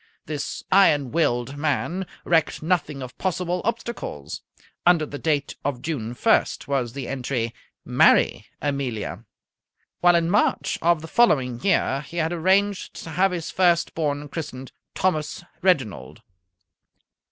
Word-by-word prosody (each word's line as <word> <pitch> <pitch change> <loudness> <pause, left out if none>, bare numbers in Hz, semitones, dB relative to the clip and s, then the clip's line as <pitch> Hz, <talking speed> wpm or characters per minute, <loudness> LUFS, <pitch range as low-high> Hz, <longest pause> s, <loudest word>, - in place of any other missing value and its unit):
This 150 -2 -4
iron 150 -9 +4
willed 135 -5 0
man 165 +5 -1 0.2
recked 165 -2 +1
nothing 155 -5 0
of 125 0 -9
possible 180 -1 -1
obstacles. 230 - -4 0.4
Under 175 -3 +4
the 145 -1 -7
date 145 -3 0
of 135 -3 -3
June 125 -7 -3
1st 220 - +2
was 130 -5 -1
the 140 0 -5
entry: 125 -3 -2 0.3
"Marry - - +4 0.2
Amelia"; 140 -7 -3 0.7
while 175 0 +5
in 170 -1 +2
March 205 +5 +1
of 170 -2 +2
the - - -6
following 130 - +2
year 155 -8 +2
he 150 +4 -10
had 165 0 0
arranged 190 +3 +1
to 160 - -8
have 190 +4 +3
his 170 -3 -4
first 175 -2 +2
born 145 -2 -2
christened 135 -4 -6 0.2
Thomas 165 -3 -1 0.2
Reginald. 130 - 0
155 Hz, 130 wpm, -24 LUFS, 135-175 Hz, 0.7 s, while